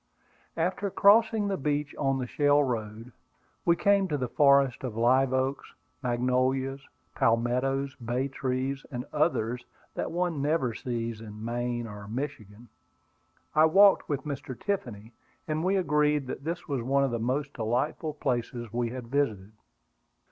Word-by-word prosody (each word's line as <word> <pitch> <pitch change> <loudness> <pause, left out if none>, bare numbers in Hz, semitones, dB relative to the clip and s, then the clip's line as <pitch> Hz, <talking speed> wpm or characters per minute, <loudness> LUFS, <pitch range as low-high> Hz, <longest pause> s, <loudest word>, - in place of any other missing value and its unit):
After 185 +4 0
crossing 215 +2 +4
the 195 -1 -1
beach 145 +1 -1
on 135 -2 0
the 130 - -2
shell 145 +3 +3
road, 115 -2 -4 0.5
we 170 - +5
came 200 +1 +3
to 150 -4 -1
the 130 -2 -2
forest 140 -1 +4
of 120 -4 -4
live 130 +3 +3
oaks, 130 +1 -1 0.3
magnolias, 130 +2 0 0.3
palmettos, 125 +4 +1
bay 125 +2 -2
trees, 135 0 -2
and 125 -3 -5
others 125 -6 0 0.3
that - - -3
one 175 -4 -1
never 145 -5 +1
sees 115 -2 -4
in 105 0 -8
Maine 120 0 -2
or 105 -2 -9
Michigan. 115 -2 -6 0.9
I 155 +1 +6
walked 195 +5 +5
with 145 -3 -1
Mr. 140 -3 -6
Tiffany, 120 - -4 0.3
and 155 0 -1
we 190 +2 +2
agreed 150 -5 +2
that 130 +1 -6
this 170 +2 -4
was 140 -5 -1
one 135 +3 +2
of 135 - 0
the 115 - -2
most 135 +5 -1
delightful 130 +7 -1
places 120 -5 -3
we 120 0 0
had 125 0 -6
visited. 110 -7 -1
135 Hz, 150 wpm, -28 LUFS, 120-150 Hz, 0.9 s, I